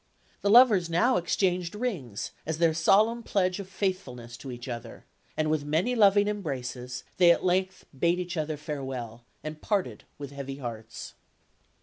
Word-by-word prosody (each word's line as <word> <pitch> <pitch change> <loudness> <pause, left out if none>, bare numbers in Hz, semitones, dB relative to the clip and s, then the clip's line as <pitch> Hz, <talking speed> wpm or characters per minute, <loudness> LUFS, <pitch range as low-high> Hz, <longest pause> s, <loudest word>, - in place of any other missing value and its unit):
The 200 - +1
lovers 210 -7 +6
now 235 +10 +3
exchanged 180 0 0
rings, 165 - -4
as 160 0 -3
their 165 -1 +3
solemn 215 +8 +3
pledge 185 -4 0
of 195 -2 -7
faithfulness 130 - -3
to 135 - -8
each 120 +1 -8
other; 115 -2 -7 0.3
and 155 0 +1
with 155 -2 0
many 160 +11 +1
loving 205 -3 +5
embraces, 125 -10 -4
they 175 -2 +6
at 170 - +4
length 185 +1 0
bade 170 +6 +2
each 180 0 -4
other 155 -1 -2
farewell, 130 -6 -6 0.2
and 155 0 -7
parted 200 -4 -1
with 140 -1 -7
heavy 140 -1 -6
hearts. 115 -3 -7
165 Hz, 155 wpm, -28 LUFS, 135-190 Hz, 0.3 s, lovers